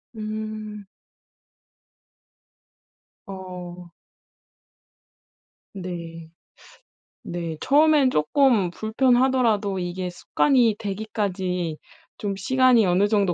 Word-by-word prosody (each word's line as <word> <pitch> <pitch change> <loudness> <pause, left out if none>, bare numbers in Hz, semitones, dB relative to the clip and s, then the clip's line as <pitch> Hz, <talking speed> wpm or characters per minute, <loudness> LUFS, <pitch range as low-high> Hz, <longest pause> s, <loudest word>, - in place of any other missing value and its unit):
음. 215 -1 -6 2.4
어. 180 -2 -9 1.8
네. 170 -4 -7 0.9
네. 170 -2 -5
처음엔 295 -1 +4
쪼끔 225 - +2
불편하더라도 230 -2 +1
이게 180 +1 -4
습관이 235 +5 +2
되기까지 190 -5 -3 0.4
좀 200 -2 -3
시간이 255 +2 +3
어느 185 +3 +3
정도 200 -4 +1
205 Hz, 145 characters per minute, -23 LUFS, 180-225 Hz, 2.4 s, 처음엔